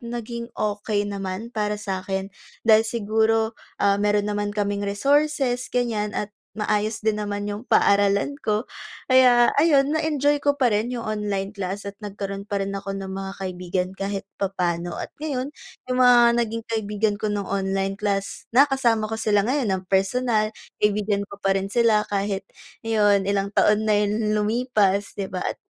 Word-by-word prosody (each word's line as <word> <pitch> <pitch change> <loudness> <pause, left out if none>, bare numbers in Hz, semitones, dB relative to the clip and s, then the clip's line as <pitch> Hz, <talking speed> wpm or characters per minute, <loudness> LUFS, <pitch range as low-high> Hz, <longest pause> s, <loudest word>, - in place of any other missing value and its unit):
naging 235 -1 -6
okey 205 0 -1
naman 200 +3 -5
para 210 -2 -1
sa'kin 195 -1 -4 0.3
dahil 220 -1 +6
siguro, 220 0 +1 0.3
ah, 200 0 +3
meron 205 0 +2
naman 205 0 -1
kaming 205 -1 -1
resources, 270 +3 +1
ganiyan 225 -4 -1
at 210 0 -2 0.3
maayos 210 +1 0
din 210 -1 +1
naman 205 0 -3
yung 205 +2 -4
paaralan 200 +5 +3
ko 215 +2 0 0.4
kaya 250 -2 +5
ayun, 290 -2 +4
na-enjoy 295 -2 +1
ko 285 0 +2
pa 250 -5 +2
rin 210 +3 +1
yung 240 -2 -4
online 205 -2 -2
class 200 -1 -4
at 200 - -5
nagkaroon 200 0 -6
pa 205 - -1
rin 195 - -4
ako 195 0 -4
ng 190 -1 -6
mga 195 0 -5
kaibigan 180 -1 -3
kahit 195 0 -4 0.2
papa'no. 175 -3 -1
At - - -6
ngayon 285 -2 -3 0.4
yung 255 - 0
mga 240 -1 +6
naging 230 0 -3
kaibigan 215 -1 -1
ko 215 - -1
ng 205 -1 -2
online 195 0 -1
class, 200 -1 -2
nakasama 260 -6 +4
ko 220 - -4
sila 205 -2 +2
ngayon 255 -2 0
ng 190 -1 -1
personal, 215 +3 +2 0.3
kaibigan 210 -1 +1
ko 200 - -10
pa 195 -1 +1
rin 195 0 -1
sila 225 -2 +3
kahit 200 -1 -1 0.4
ngayon, 205 -3 +2
ilang 200 0 0
taon 210 +1 +3
na 215 - +3
yung 210 +1 0
lumipas, 210 -3 +1
'di 195 -1 -4
ba? 180 -1 -4
At, - - -2
210 Hz, 165 wpm, -23 LUFS, 200-235 Hz, 0.4 s, dahil